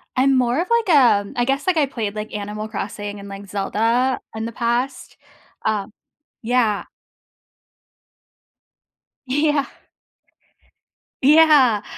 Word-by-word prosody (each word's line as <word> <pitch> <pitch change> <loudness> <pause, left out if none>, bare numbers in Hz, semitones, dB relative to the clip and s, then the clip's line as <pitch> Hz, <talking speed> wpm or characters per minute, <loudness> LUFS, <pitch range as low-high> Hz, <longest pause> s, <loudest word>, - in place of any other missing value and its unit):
I'm 265 +1 +3
more 250 +2 +1
of 360 - -4
like, 470 -3 +1
a 235 -7 +4
I 240 - +2
guess, 275 +2 -1
like, 365 -3 +2
I 300 - +4
played, 225 -6 -4
like, 215 0 -6
Animal 210 +1 -5
Crossing 205 -1 -6
and, 200 0 -10
like, 200 0 -9
Zelda 225 +6 0 0.2
in 220 0 -4
the 230 - -5
past, 240 +3 -2 0.5
uh 210 -2 0 0.6
yeah. 230 -3 +1 2.4
Yeah. 290 +1 +1 1.6
Yeah. 285 -7 +5
240 Hz, 115 wpm, -21 LUFS, 210-275 Hz, 2.4 s, Yeah